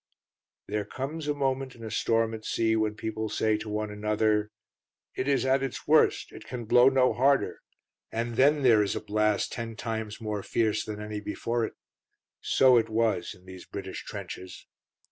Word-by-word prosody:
There 105 0 -1
comes 145 +7 -5
a 145 - 0
moment 135 -2 -1
in 115 - -12
a 110 - -6
storm 115 +1 +1
at 110 -1 -7
sea 110 0 +1
when 110 -1 0
people 110 0 -3
say 110 0 +1
to 110 0 -7
one 105 0 -2
another, 105 0 +1 0.6
"It 130 - -3
is 140 -2 +2
at 130 0 +3
its 135 -2 -4
worst; - - +3
it - - -11
can 120 -2 -6
blow 125 +4 +6
no 130 -3 +3
harder," 135 +4 +2 0.5
and 115 +1 -2
then 145 +3 +4
there 115 -4 +6
is 100 -1 0
a - - -1
blast 105 0 0
ten 115 -1 -5
times 110 -2 -4
more 105 -2 -3
fierce 110 0 0
than 105 -1 -6
any 105 0 -5
before 115 +3 -2
it. - - -7 0.7
So 130 -2 +5
it 115 - +1
was 110 -4 0
in 90 - -21
these 95 -1 -10
British - - -6
trenches. 95 0 -8
110 Hz, 185 wpm, -28 LUFS, 105-125 Hz, 0.7 s, blow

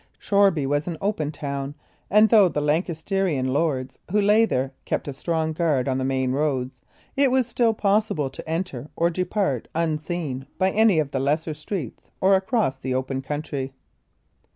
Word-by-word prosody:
Shoreby 200 -8 +3
was 145 +3 0
an 170 -2 -3
open 195 -7 -1
town, 140 -1 -4 0.3
and 215 +2 +6
though 210 -5 +6
the 150 - -2
Lancastrian 160 -2 0
lords 135 -4 -1
who 210 +3 +2
lay 210 +2 +5
there 135 -8 -1
kept - - -2
a 140 - -3
strong 160 +2 -1
guard 155 -6 +1
on 130 -1 0
the - - -1
main 130 -1 0
roads, 130 -3 -1 0.3
it 275 0 +4
was 260 0 +2
still 230 -2 +1
possible 200 -10 +1
to - - -9
enter 160 -5 -3
or 170 +1 +2
depart 180 - -1
unseen 155 -4 -2
by 190 0 +2
any 215 -3 +4
of 150 -3 0
the 135 - -1
lesser 155 +4 0
streets 155 - -6
or 190 +1 +4
across 195 - +1
the 130 -1 -2
open 130 +1 -2
country. 140 -1 -4
155 Hz, 170 wpm, -24 LUFS, 135-195 Hz, 0.3 s, and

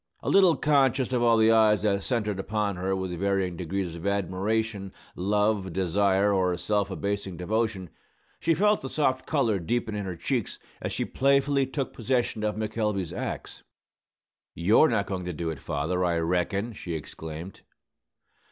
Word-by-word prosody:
A - - 0
little 190 -4 +6
conscious 135 -3 +2
of 125 - +1
all 115 -1 +4
the 110 0 +5
eyes 110 -2 +4
that 100 -2 +1
centred 105 -4 -1
upon 105 0 -1
her 95 +2 -1
with 95 -2 -4
varying 95 -2 0
degrees 90 +1 -3
of 85 +3 -5
admiration, 100 +1 -1 0.2
love, 105 0 0
desire, 95 +2 +2
or 90 -2 +1
self 105 +1 0
abasing 100 -1 -3
devotion, 100 -1 -2 0.5
she 165 0 +2
felt 210 +5 +3
the 135 - -5
soft 130 -3 0
color 115 -10 +1
deepen 110 +5 -2
in 105 -1 -3
her 90 -2 -4
cheeks 120 +6 -2 0.2
as - - -3
she - - -2
playfully 140 0 +2
took 135 0 -3
possession 120 -2 -1
of 105 0 0
McElvey's 105 -4 -2
axe. - - -5 0.9
"You're 105 - +4
not 105 -4 +1
goin' 95 -2 -4
to 90 - -3
do 80 +1 -3
it, 75 - -7
father, 80 +7 -1
I 85 -2 +1
reckon!" 90 +6 -1
she 85 -5 -5
exclaimed. 80 +3 -8
100 Hz, 160 wpm, -27 LUFS, 90-115 Hz, 0.9 s, little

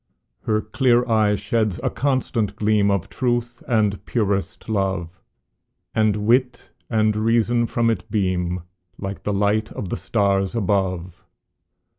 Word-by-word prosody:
Her 110 -1 +2
clear 120 +2 +2
eye 110 -3 +3
sheds 105 0 -1
a - - 0
constant 120 -7 0
gleam 105 -1 +2
Of 100 -1 0
truth 120 -1 -2
and 105 -4 +1
purest 100 -4 -1
love, 95 -5 -2 0.7
And 105 -1 +1
wit 125 +2 +1 0.2
and 110 -2 +2
reason 115 +2 +2
from 115 0 +1
it 110 - -4
beam, 90 -4 -1 0.3
Like 95 0 -5
the 105 - -2
light 105 +2 +1
of 95 - -5
the - - -2
stars 100 -1 0
above. 90 -4 -1
105 Hz, 130 wpm, -22 LUFS, 100-115 Hz, 0.7 s, eye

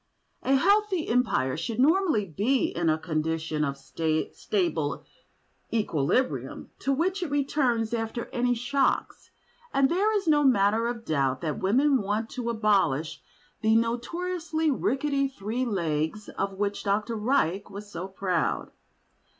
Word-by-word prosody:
A 270 - +2
healthy 400 +2 +2
Empire 225 - +1
should 220 +8 -4
normally 315 - +3
be 210 - +1
in 170 -1 +1
a 155 - +2
condition 160 -1 -2
of 140 -1 -2
stable 165 - -1 0.7
equilibrium, 215 - -1
to 275 - 0
which 365 +8 0
it 350 - -2
returns 260 -5 0
after 230 +1 -2
any 245 -1 +1
shocks, 270 +3 0 0.4
and 275 -1 +3
there 400 +5 +2
is 390 -4 -4
no 295 -2 +4
manner 225 -3 +3
of 235 -1 -4
doubt 135 -4 0
that 155 -3 -2
women 260 +7 +3
want 210 +3 -2
to 245 -2 -3
abolish 200 -10 +1 0.4
the 220 +1 +3
notoriously 320 +8 -1
rickety 275 +1 0
three 245 0 -3
legs 170 -2 -2
of 195 - -3
which 200 +1 -2
Dr. 210 +3 0
Reich 210 - 0
was 205 +1 -9
so 175 +1 -5
proud. 190 -3 -1
230 Hz, 135 wpm, -27 LUFS, 190-275 Hz, 0.7 s, no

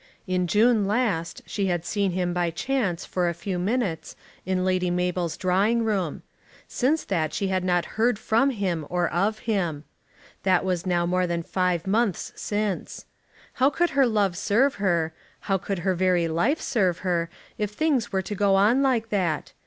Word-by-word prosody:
In 180 -1 0
June 215 +1 +3
last 200 -7 -1
she 200 -2 -2
had 175 -2 -1
seen 200 -3 0
him, 180 -1 -1
by 175 -1 0
chance, 200 -1 -1
for 180 -2 0
a 170 - -4
few 180 +1 -4
minutes, 190 -5 -2 0.3
in 185 -1 0
Lady 185 -1 +1
Mabel's 180 -2 -1
drawing 200 +6 +2
room. 190 -8 -1 0.4
Since 290 +6 0
that 160 -5 -1
she 195 - -1
had 185 -1 0
not 175 -1 +1 0.2
heard 235 -1 +3
from 225 +5 +2
him 185 - -2
or 175 0 +1
of 200 +6 0
him. 175 -9 -1 0.6
That 185 -1 +2
was 180 -1 -1
now 175 -1 +1
more 180 +1 +1
than 170 -1 -2
five 180 -1 0
months 210 0 0
since. 205 -3 -3 0.6
How 265 - +6
could 345 +5 0
her 275 -2 +4
love 205 -5 +1
serve 235 +9 +2
her, 170 -5 +1 0.3
how 195 -1 0
could 195 +1 -3
her 190 - +3
very 180 -1 +2
life 175 - +1
serve 185 -7 +1
her, 170 -2 0 0.3
if 210 -1 0
things 265 +1 0
were 190 -1 0
to 205 - -5
go 200 -1 +2
on 215 +7 +4
like 245 -5 +1
that? 180 -7 -1
190 Hz, 175 wpm, -25 LUFS, 175-215 Hz, 0.6 s, How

